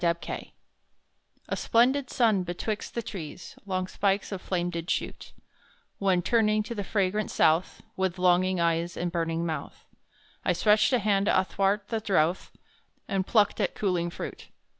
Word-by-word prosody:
Aileen 170 0 -2 1.0
A - - -2
splendid 255 +3 +2
sun 220 -6 +3
betwixt 180 +4 -4
the 235 - -2
trees 175 -5 -8
Long 185 -1 -1
spikes 195 +2 0
of 195 -2 -4
flame 175 -1 -1
did 170 0 -5
shoot, - - -3 0.7
When 185 -3 +2
turning 215 -1 +2
to 225 - -5
the 205 -3 -4
fragrant 200 +1 0
South, 160 +3 +2
With 190 -1 -1
longing 180 0 +3
eyes 170 0 0
and 175 0 -2
burning 165 -1 -1
mouth, 160 -2 -5 0.6
I - - +2
stretched 210 +3 +3
a 255 - +4
hand 205 -3 +1
athwart 195 +2 +1
the 225 - -1
drouth, 185 -5 +1 0.6
And 195 -1 -1
plucked 210 -3 +3
at - - -1
cooling 180 -4 0
fruit. - - -7
190 Hz, 150 wpm, -27 LUFS, 175-210 Hz, 1.0 s, a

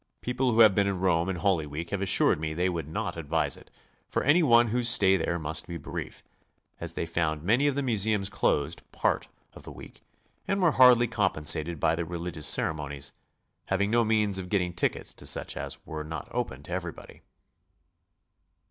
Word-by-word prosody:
People 125 +1 -1
wiho - - +4
have 115 - 0
GOING 115 - +8
ABROAD? 105 -3 +5
been 100 -1 +2
in 95 -2 -2
Rome 90 -1 +1
in 95 - -2
Holy 85 -3 0
Week 80 +4 -6
have 100 -1 -2
assured 95 -5 +2
'me 80 0 -4
they 90 +2 +1
would 85 -4 -4
not 80 - -4
advise 80 -4 -1
it - - -17 0.4
for - - -1
any 150 +6 +4
one 120 -6 +5
whose 120 +1 +1
stay 95 -5 +5
there 85 -1 -1
must 80 +1 -3
be 85 - -5
brief, 75 - -7 0.6
as - - -5
they - - -2
found 80 -2 -2
many 120 - +2
of 140 - 0
the 140 - -1
museums 110 -4 +1
closed 75 -4 0
part - - -1 0.3
oi - - -10
the - - -10
week, - - -13 0.5
and 195 - 0
were 175 -4 +4
hardly 125 -3 +6
compensiated 85 -6 +1
by 80 +2 +2
the 85 - -2
religious 85 -2 -4
cere - - +2
monies, 70 -2 -7 0.5
having 100 +2 0
no 120 0 +3
means 105 -3 +2
of 90 -1 -7
getting 90 -3 0
tickets - - -1
to - - -6
such - - 0
as - - -4
were 75 -1 -6
not 75 -1 -7
open 70 +2 -4
to 85 - -11
everybody. 90 -2 -6
90 Hz, 200 wpm, -27 LUFS, 80-110 Hz, 0.6 s, GOING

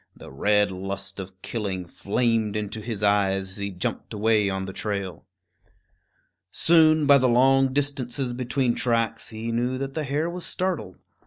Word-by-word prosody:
The - - -12
red 105 +7 +2
lust 100 +1 -6
of 95 +1 -9
killing 100 -6 -3
flamed 110 +3 0
into 105 +1 -3
his 105 -2 -5
eyes 95 -2 +2
as 95 - -6
he 100 0 -3
jumped 90 +3 -4
away 105 -1 +2
on 95 0 -3
the 95 - -7
trail. 100 -5 -4 1.2
Soon, 155 - +4
by 140 0 +7
the 130 0 +3
long 135 +2 +4
distances 135 -2 -1
between 125 0 0
tracks, 115 -2 0
he 110 +1 -5
knew 120 +2 -1
that 135 0 -4
the 155 - -2
hare 145 +3 -1
was 175 +1 -5
startled. 180 - -3
110 Hz, 160 wpm, -25 LUFS, 100-130 Hz, 1.2 s, by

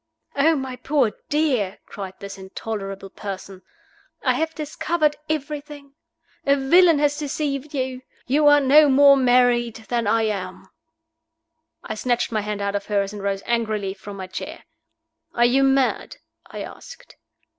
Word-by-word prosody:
"Oh, 315 +3 +4
my 265 -3 -4
poor 260 -3 +1 0.2
dear!" 265 -11 0
cried 190 -2 -8
this 200 0 -8
intolerable 195 0 -6
person. 195 -2 -8 0.6
"I - - +3
have 320 0 -2
discovered 305 0 -1
everything. 290 -1 -5 0.5
A 280 - +3
villain 330 +4 +5
has 290 0 +1
deceived 290 -1 -3
you. 260 -1 -3 0.2
You 295 +3 +3
are 290 0 +7
no 290 +2 +6
more 280 +1 +7
married 245 -3 +3
than 235 -3 0
I 225 +2 +2
am!" 195 -4 -4 1.2
I - - -5
snatched 240 +3 -1
my 215 -2 0
hand 205 -1 -4
out 200 0 -1
of 200 -1 -3
hers, 200 -1 0
and 205 - -7
rose 195 0 -2
angrily 215 -4 -1
from 200 +1 -10
my 190 - -5
chair. 185 0 -7 0.7
"Are 240 - +4
you 255 +3 +3
mad?" 270 -1 +1 0.3
I - - -7
asked. - - -12
250 Hz, 145 wpm, -22 LUFS, 205-285 Hz, 1.2 s, are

